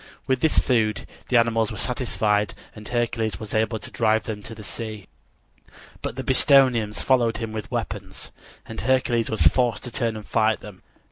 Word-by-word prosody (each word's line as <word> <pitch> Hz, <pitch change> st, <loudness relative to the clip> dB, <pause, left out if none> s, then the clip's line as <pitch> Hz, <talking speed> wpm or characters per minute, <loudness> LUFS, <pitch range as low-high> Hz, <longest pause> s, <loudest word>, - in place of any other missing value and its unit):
With 130 Hz, -1 st, +1 dB
this 160 Hz, +3 st, +2 dB
food 110 Hz, -4 st, +2 dB, 0.2 s
the 125 Hz, -, +4 dB
animals 115 Hz, -2 st, +2 dB
were 105 Hz, -, -6 dB
satisfied 105 Hz, -4 st, 0 dB, 0.2 s
and 105 Hz, 0 st, -10 dB
Hercules 115 Hz, -5 st, -1 dB
was 110 Hz, -2 st, -7 dB
able 110 Hz, +1 st, +1 dB
to -, -, -9 dB
drive 110 Hz, -1 st, +2 dB
them 105 Hz, -2 st, -5 dB
to 115 Hz, +2 st, -9 dB
the 105 Hz, -, -10 dB
sea. 110 Hz, 0 st, -7 dB, 0.9 s
But -, -, -4 dB
the 130 Hz, -, -4 dB
Bistonians 130 Hz, -5 st, +4 dB
followed 120 Hz, -4 st, +2 dB
him 115 Hz, -2 st, -4 dB
with 110 Hz, -1 st, -6 dB
weapons, -, -, -5 dB, 0.3 s
and 115 Hz, -, -6 dB
Hercules 120 Hz, -1 st, +1 dB
was 110 Hz, -, +1 dB
forced 120 Hz, -4 st, +3 dB
to 125 Hz, -, -6 dB
turn 115 Hz, -2 st, -1 dB
and 105 Hz, -1 st, -8 dB
fight 110 Hz, -1 st, +1 dB
them. 100 Hz, -3 st, -11 dB
115 Hz, 180 wpm, -24 LUFS, 110-120 Hz, 0.9 s, the